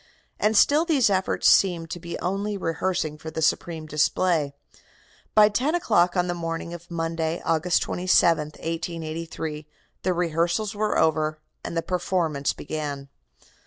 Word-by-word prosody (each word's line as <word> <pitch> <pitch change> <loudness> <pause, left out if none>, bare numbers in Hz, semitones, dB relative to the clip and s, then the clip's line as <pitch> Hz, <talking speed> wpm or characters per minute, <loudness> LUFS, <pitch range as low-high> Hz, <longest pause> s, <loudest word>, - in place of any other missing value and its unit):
And 215 0 +2
still 295 +7 +5
these 285 - +3
efforts 190 -1 +1
seemed 170 -4 +4
to 175 - -4
be 170 0 -6
only 200 +3 -2
rehearsing 165 -3 -2
for 160 - -7
the 160 - -5
supreme 160 0 0
display. 155 -1 +1 0.8
By 210 -1 +8
ten 255 +10 0
o'clock 190 - +2
on 180 - +3
the 175 - -1
morning 165 0 -4
of 175 0 -10
Monday, 165 -1 -2
August 165 +2 +2
27, 170 -3 +3
1883, 160 -1 -5 0.3
the 185 - +1
rehearsals 175 +5 0
were 215 0 0
over, 155 -1 +1 0.2
and 170 - -4
the 165 - 0
performance 175 -5 0
began. 145 -2 -5
170 Hz, 140 wpm, -25 LUFS, 160-185 Hz, 0.8 s, By